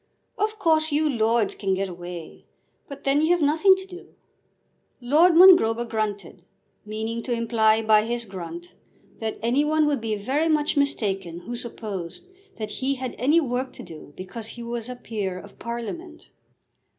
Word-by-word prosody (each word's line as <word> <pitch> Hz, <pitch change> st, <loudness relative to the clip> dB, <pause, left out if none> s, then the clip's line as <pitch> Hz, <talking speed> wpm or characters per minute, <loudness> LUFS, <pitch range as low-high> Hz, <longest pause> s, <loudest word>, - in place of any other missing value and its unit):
"Of 430 Hz, +1 st, -1 dB
course 315 Hz, -3 st, +2 dB
you 305 Hz, +2 st, +2 dB
lords 230 Hz, -4 st, +1 dB
can 195 Hz, -2 st, -1 dB
get 195 Hz, +1 st, -1 dB
away, 175 Hz, -2 st, -9 dB, 0.4 s
but 280 Hz, -1 st, -10 dB
then 275 Hz, +1 st, +2 dB
you 315 Hz, -, +2 dB
have 350 Hz, -, 0 dB
nothing 320 Hz, +7 st, +5 dB
to 380 Hz, 0 st, -8 dB
do." 370 Hz, 0 st, -13 dB, 0.8 s
Lord 310 Hz, +8 st, +4 dB
Mongrober 330 Hz, -11 st, +7 dB
grunted, 205 Hz, -6 st, -4 dB, 0.4 s
meaning 220 Hz, +2 st, -4 dB
to 245 Hz, -, -6 dB
imply 225 Hz, -2 st, +2 dB
by 215 Hz, -1 st, +4 dB
his 235 Hz, 0 st, -3 dB
grunt 215 Hz, -, -8 dB, 0.5 s
that 220 Hz, -1 st, -3 dB
any 250 Hz, +5 st, +2 dB
one 310 Hz, 0 st, +2 dB
would 290 Hz, -4 st, 0 dB
be 220 Hz, -1 st, -1 dB
very 275 Hz, +10 st, 0 dB
much 300 Hz, -1 st, +1 dB
mistaken 195 Hz, -, -1 dB
who 240 Hz, +6 st, -6 dB
supposed 215 Hz, -7 st, -7 dB, 0.3 s
that 215 Hz, -1 st, -5 dB
he 265 Hz, +6 st, -1 dB
had 255 Hz, -1 st, -5 dB
any 295 Hz, +7 st, +4 dB
work 260 Hz, -3 st, -2 dB
to -, -, -10 dB
do 155 Hz, -3 st, -11 dB
because 210 Hz, +4 st, -7 dB
he 235 Hz, +1 st, -8 dB
was 235 Hz, 0 st, -5 dB
a 250 Hz, -, -5 dB
peer 205 Hz, -6 st, -4 dB
of 200 Hz, +2 st, -13 dB
Parliament. 275 Hz, -, -7 dB
235 Hz, 165 wpm, -24 LUFS, 215-295 Hz, 0.8 s, Mongrober